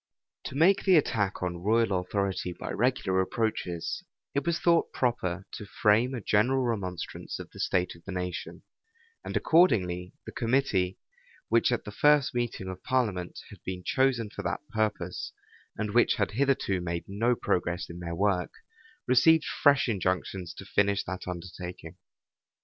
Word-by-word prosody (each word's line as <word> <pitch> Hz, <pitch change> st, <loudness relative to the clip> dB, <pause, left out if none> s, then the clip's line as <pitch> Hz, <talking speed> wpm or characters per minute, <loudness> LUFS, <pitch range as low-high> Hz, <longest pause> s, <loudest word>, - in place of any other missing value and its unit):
To -, -, -6 dB
make 185 Hz, +7 st, +4 dB
the 190 Hz, -2 st, +5 dB
attack 105 Hz, -, +1 dB
on 90 Hz, -1 st, -2 dB
royal 110 Hz, -1 st, +2 dB
authority 95 Hz, -1 st, -2 dB
by -, -, -6 dB
regular 115 Hz, -6 st, +1 dB
approaches, 100 Hz, -, -2 dB, 0.3 s
it 140 Hz, +3 st, -1 dB
was 170 Hz, -1 st, +2 dB
thought 170 Hz, -1 st, +3 dB
proper 95 Hz, -7 st, -1 dB
to 105 Hz, -, -8 dB
frame 110 Hz, +6 st, +2 dB
a 120 Hz, -, -4 dB
general 125 Hz, +7 st, +2 dB
remonstrance 100 Hz, -7 st, -4 dB
of -, -, -9 dB
the -, -, -13 dB
state 90 Hz, -1 st, 0 dB
of 85 Hz, -, -19 dB
the 100 Hz, -, -6 dB
nation; 90 Hz, -1 st, -5 dB, 0.6 s
and -, -, -2 dB
accordingly 90 Hz, -, +3 dB
the -, -, -7 dB
committee, 115 Hz, -7 st, +1 dB, 0.5 s
which 115 Hz, +2 st, +3 dB
at 120 Hz, -, 0 dB
the 105 Hz, -, -7 dB
first 145 Hz, +4 st, +4 dB
meeting 120 Hz, -6 st, -2 dB
of 95 Hz, 0 st, -6 dB
parliament 105 Hz, -9 st, -1 dB
had -, -, -13 dB
been 90 Hz, -1 st, -5 dB
chosen 125 Hz, -4 st, +1 dB
for -, -, -6 dB
that 90 Hz, -, -4 dB
purpose, 105 Hz, -5 st, -2 dB, 0.4 s
and 105 Hz, -1 st, -2 dB
which 120 Hz, -, +4 dB
had 100 Hz, -2 st, 0 dB
hitherto 125 Hz, -6 st, +1 dB
made 85 Hz, -1 st, -3 dB
no 115 Hz, +5 st, +1 dB
progress 90 Hz, -4 st, -1 dB
in 85 Hz, +1 st, -9 dB
their 85 Hz, -1 st, -4 dB
work, 95 Hz, -1 st, +1 dB, 0.6 s
received 150 Hz, +6 st, +5 dB
fresh 145 Hz, -3 st, +3 dB
injunctions 95 Hz, -3 st, -2 dB
to 100 Hz, -, -9 dB
finish 100 Hz, 0 st, +1 dB
that 95 Hz, -1 st, -6 dB
undertaking. 90 Hz, 0 st, -7 dB
105 Hz, 155 wpm, -28 LUFS, 90-125 Hz, 0.6 s, the